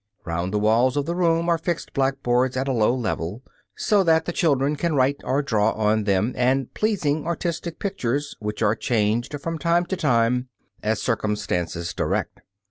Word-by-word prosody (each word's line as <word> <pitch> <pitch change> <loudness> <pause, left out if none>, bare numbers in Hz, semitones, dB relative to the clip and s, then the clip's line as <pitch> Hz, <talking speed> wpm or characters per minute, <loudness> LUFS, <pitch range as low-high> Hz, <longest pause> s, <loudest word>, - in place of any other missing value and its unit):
Round 85 +1 -2
the 105 - 0
walls 115 +6 +3
of 145 - 0
the 170 - -2
room 170 -1 +1
are 170 -1 +2
fixed 170 0 -3
blackboards 130 -2 +1
at 135 +1 -1
a - - +1
low 115 +1 +2
level, 110 -2 -3 0.3
so 205 -2 +2
that 160 -2 +3
the - - -2
children 145 -4 +1
can 165 +1 -1
write 135 +1 +2
or 140 +3 0
draw 110 -4 +1
on 110 0 +1
them, 100 +4 +1
and 130 +1 +1
pleasing, 160 -9 0
artistic 170 -1 -3
pictures, 145 - -2
which 105 +1 -3
are 105 0 +4
changed 115 +5 0
from 165 +2 -4
time 170 +1 +2
to 190 - -2
time 125 -5 +1 0.3
as 110 0 0
circumstances 90 -7 -2
direct. - - -2
130 Hz, 175 wpm, -23 LUFS, 110-160 Hz, 0.3 s, are